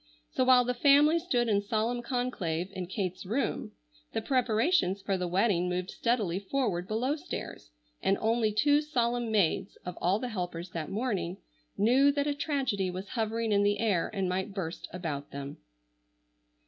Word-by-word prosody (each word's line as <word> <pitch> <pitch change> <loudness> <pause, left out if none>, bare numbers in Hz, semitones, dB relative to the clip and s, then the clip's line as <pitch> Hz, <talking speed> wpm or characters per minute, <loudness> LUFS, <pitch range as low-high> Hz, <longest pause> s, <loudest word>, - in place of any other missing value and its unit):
So - - +1
while 255 -1 +6
the 250 - 0
family 290 +5 +5
stood 250 -9 0
in 205 -2 +2
solemn 225 +4 -1
conclave 195 - -2
in 185 -2 -4
Kate's 185 -1 -3
room 225 +9 -2 0.4
the - - -1
preparations 245 - +2
for 195 0 -1
the 180 -1 -2
wedding 180 -1 +2
moved 180 +1 -2
steadily 215 -7 0
forward 200 -5 -1
below 245 +7 0
stairs, 310 - -7 0.3
and 195 - +2
only 225 0 +2
two 290 +7 +3
solemn 240 -5 0
maids, 195 -2 +1
of 180 -1 -5
all 185 +3 +3
the 250 +2 -4
helpers 180 -4 -4
that 160 -3 -4
morning, 195 -6 -2 0.4
knew 255 +7 +5
that 285 0 0
a 295 - +1
tragedy 265 - -1
was 185 +2 -6
hovering 225 -1 -1
in 200 -1 +4
the 205 0 +2
air 200 -6 +1
and 195 -3 -1
might 190 +2 -2
burst 170 -4 -4
about 155 -6 -4
them. 140 0 -7
215 Hz, 165 wpm, -30 LUFS, 185-250 Hz, 0.4 s, while